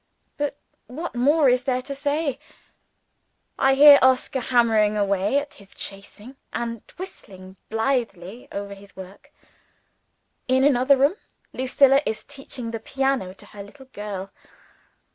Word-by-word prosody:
But 290 -1 -3 0.3
what 320 +8 -6
more 285 +5 +3
is 250 0 +2
there 255 -2 -1
to 280 - -5
say? 285 0 -2 1.2
I 270 0 +4
hear 285 0 +9
Oscar 260 +1 +2
hammering 225 -4 +2
away 200 +4 +1
at 285 0 -3
his 200 -1 -15
chasing, 205 +6 -8
and 230 -2 -4 0.2
whistling 190 - -10
blithely 225 -3 -2
over 200 0 -5
his 200 0 -15
work. 190 +9 -12 1.2
In 260 +1 +3
another 275 0 +4
room, 280 +9 +2 0.4
Lucilla 270 +2 +3
is 220 - -4
teaching 270 -4 -8
the 225 - -4
piano 270 -8 -2
to - - -14
her 205 - -11
little 265 +7 -13
girl. 195 -2 -6
250 Hz, 130 wpm, -23 LUFS, 205-275 Hz, 1.2 s, hear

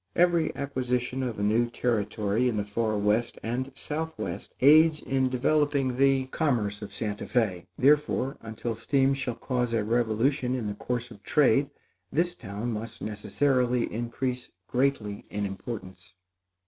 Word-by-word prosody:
Every 170 -2 +3
acquisition 130 -2 -2
of 125 -4 -3
a 100 - -2
new 115 +3 +2
territory 110 0 0
in 110 - -2
the 100 - -1
far 110 +1 -1
west 105 +3 +1
and 130 +4 -2
southwest 150 - -4
aids 155 +3 +6
in 130 -2 0
developing 135 0 +1
the 135 -1 +4
commerce 110 -10 0
of 105 -1 -7
Santa 105 0 -4
Fé; 105 -8 0
therefore, 140 -1 +3
until 115 +1 -4
steam 135 +4 +2
shall 135 -3 -3
cause 125 -3 -1
a 110 - +1
revolution 120 +4 +1
in 120 -4 -3
the 105 - -2
course 120 +3 -4
of 100 - -12
trade, 140 +3 +3 0.4
this 175 +3 +1
town 110 - -5
must 110 +2 -6
necessarily 125 +4 0
increase 120 +2 -3 0.2
greatly 125 -6 -1
in 105 0 -2
importance. 95 -2 -7
120 Hz, 145 wpm, -27 LUFS, 105-135 Hz, 0.4 s, aids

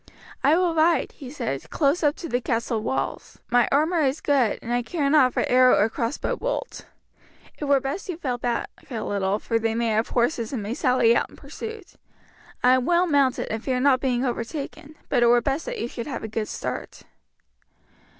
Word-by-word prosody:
"I 300 +4 +5
will 355 -2 +2
ride," 325 +1 +2
he 270 -4 -10
said, 140 - -4
"close 295 +3 +1
up 295 -2 +2
to 340 - -7
the 245 -4 -1
castle 230 -2 -1
walls. 265 - -3
My 245 0 +4
armour 315 +4 +2
is 275 0 +1
good, 265 -7 +2
and 240 - -3
I 245 - +2
care 290 +3 -2
not 265 -5 +5
for - - 0
arrow 255 0 +5
or 215 - +3
crossbow 235 +3 -2
bolt. - - -4 0.7
It 295 - -3
were 280 -1 +4
best 275 +9 -5
you 350 - -3
fell 255 -7 -3
back 240 0 -2 0.2
a 230 -4 -4
little, 200 0 0
for 230 +1 -1
they 225 0 -1
may 235 0 0
have 220 +1 0
horses 240 -2 0
and 240 -7 -3
may 210 +3 -3
sally 250 -2 +3
out - - 0
in - - -16
pursuit. 445 -4 -9 0.7
I 250 +1 +6
am 255 -1 +2
well 350 +1 +4
mounted 280 -5 +2
and 220 +1 -3
fear 255 -2 0
not 260 -1 +3
being 255 -1 0
overtaken, 275 +5 -5
but 250 - +1
it 240 - +5
were 240 +1 +6
best 275 +5 -2
that - - -4
you - - -2
should 235 +1 -6
have 280 - -5
a - - -3
good 220 0 -3
start." - - -6
255 Hz, 210 wpm, -24 LUFS, 235-295 Hz, 0.7 s, I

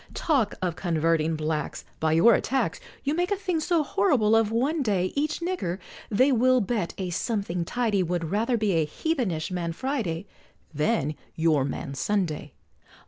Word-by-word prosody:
Talk 265 -10 +1
of 175 -3 0
converting 165 -2 +1
Blacks 155 -1 -3
By 160 0 +2
your 175 +9 +6
attacks, 265 - 0 0.2
You 285 - 0
make 355 +3 0
a 405 - +2
thing 370 -4 -1
so 325 0 +1
horrible 215 -2 +3
of 225 -2 +3
one 275 +8 +1
day, 195 -7 0
Each 300 +3 -1
nigger, 340 - -2 0.3
they 255 +7 +4
will 255 +1 +4
bet 210 -5 -2
a 185 -2 -3
something 190 -3 -1
tidy, 220 -2 0
Would 170 -2 -2
rather 230 +4 +1
be 215 -2 +1
a 165 -3 +2
heathenish 205 - -2
Man 170 -2 -2
Friday, 205 - -2 0.5
Than 150 -1 +1 0.2
your 160 -4 +3
Man 140 0 -4
Sunday! 155 -3 -1
205 Hz, 160 wpm, -26 LUFS, 165-255 Hz, 0.5 s, your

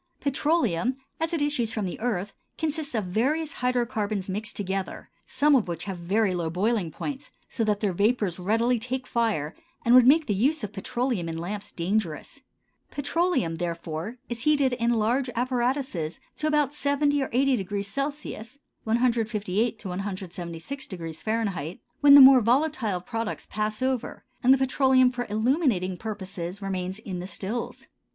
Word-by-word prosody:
Petroleum 270 - +1 0.2
as 325 +1 -1
it 325 -4 0
issues 255 -6 0
from 215 -3 -2
the 180 - -5
earth 205 -4 -2 0.2
consists 310 -3 -2
of 215 - 0
various 285 - 0
hydrocarbons 230 -6 0
mixed 210 +3 -3
together, 195 -2 -4 0.2
some 290 +3 +3
of 240 -8 +2
which 170 -1 -4
have 190 -3 -5
very 195 +3 +1
low 170 -2 -1
boiling 195 +1 0
points, 275 - -6 0.2
so 230 - -1
that 210 -2 0
their 200 -4 +1
vapors 200 -2 +1
readily 230 +6 +2
take 255 +3 -4
fire 215 -12 0 0.3
and 235 - +5
would 250 -1 +8
make 310 +3 +6
the 210 - 0
use 265 +8 +1
of 210 - -5
petroleum 235 -4 -2
in 165 - -4
lamps 200 +5 -5
dangerous. 175 -2 -2 0.5
Petroleum, 290 - 0
therefore, 170 +5 -4
is 235 -1 -5
heated 285 -2 +3
in 235 -1 0
large 240 +3 +1
apparatuses 245 - -1 0.2
to 305 - -2
about 295 -2 +2
70 285 0 +1
or 265 - -2
80° 245 0 0
C. 270 -4 -9 0.3
(158 225 -2 +1
to 205 - -7
176° 180 - -6 0.5
F.), - - -19 0.2
when 285 -1 +8
the 285 - +11
more 265 -1 +9
volatile 240 - +1
products 225 +3 -4
pass 215 +3 -2
over, 260 -2 -2 0.2
and 255 - +5
the 270 - +7
petroleum 260 -1 +4
for 245 -1 -4
illuminating 220 - +1
purposes 190 -3 -6
remains 190 -1 -3
in 195 -4 -6
the 180 - -5
stills. 205 +5 -5
225 Hz, 155 wpm, -26 LUFS, 190-265 Hz, 0.5 s, the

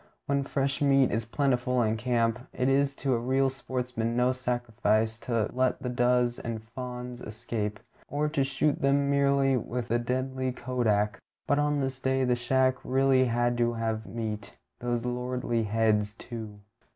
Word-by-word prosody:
When 140 -1 0
fresh 135 0 -1
meat 135 -2 +4
is 115 +1 -1
plentiful 125 -1 +1
in 110 0 +1
camp, 115 -1 +1
it 125 - 0
is 140 +1 +2
to 135 -2 0
a 120 - +1
real 130 +2 +2
sportsman 125 -3 -3
no 125 +1 +3
sacrifice 115 -3 0
to 115 -3 -1
let 130 0 +1
the 125 - -1
does 125 0 +2
and 115 -2 -5
fawns 125 +1 -7
escape, 105 -1 -4 0.3
or 150 +1 0
to 150 -2 +1
shoot 140 +2 0
them 140 +1 +3
merely 140 -1 +3
with 120 0 -4
the 120 - +2
deadly 130 +1 -2
kodak; 115 -5 0 0.3
but 145 - +2
on 145 -1 +1
this 135 -1 -3
day 130 0 +1
the 125 -1 +3
shack 130 +2 +2
really 130 0 +3
had 120 0 +1
to 120 0 +2
have 110 -1 -2
meat 105 -1 -5 0.2
those 120 -1 -2
lordly 125 -2 -1
heads, 105 -1 +1
too. 110 -4 -8
125 Hz, 165 wpm, -28 LUFS, 115-130 Hz, 0.3 s, meat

